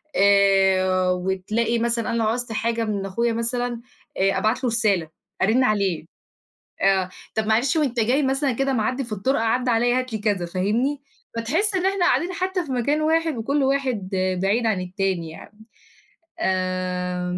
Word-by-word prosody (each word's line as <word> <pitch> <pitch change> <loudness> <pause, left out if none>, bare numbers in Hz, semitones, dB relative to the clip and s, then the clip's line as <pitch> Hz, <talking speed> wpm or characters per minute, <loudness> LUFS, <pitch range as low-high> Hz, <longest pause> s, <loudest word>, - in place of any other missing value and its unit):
آآ، 190 -2 +4
وتلاقي 190 +6 -1
مثلًا 235 0 -1
أنا 230 - -1
لو 215 - +1
عُزت 245 +1 -2
حاجة 230 +1 -1
من 200 -2 -2
أخويا 230 +5 0
مثلًا، 235 +1 -2 0.4
آآ، 195 +1 +2
أبعت 220 +5 0
له 250 - +2
رسالة، 205 -8 +1 0.3
أرن 225 +7 +3
عليه، 200 -8 0 0.8
آه، 190 -2 +2 0.3
"طب 220 -1 0
معلش 235 +8 +2
وأنت 270 -7 0
جاي 250 +6 +2
مثلًا 270 +1 +1
كده 270 +3 0
معدّي 255 +3 0
في 230 - -11
الطرقة 225 +4 0
عدّي 245 +3 +1
عليّا 240 +2 +2
هات 255 -2 -5
لي 220 - -2
كذا." 205 -4 0
فاهمني؟ 220 +11 -1 0.4
فتحس 325 - 0
إن 370 0 0
إحنا 390 -2 +2
قاعدين 355 0 +1
حتى 370 0 -2
في 280 - -7
مكان 270 +5 0
واحد 320 -1 +1
وكل 275 +5 0
واحد 260 -8 0 0.3
بعيد 210 +5 +1
عن 200 -5 +1
التاني 180 -2 -2
يعني. 205 +6 -13 0.8
آآ 180 -1 -1
225 Hz, 160 wpm, -23 LUFS, 195-255 Hz, 0.8 s, آآ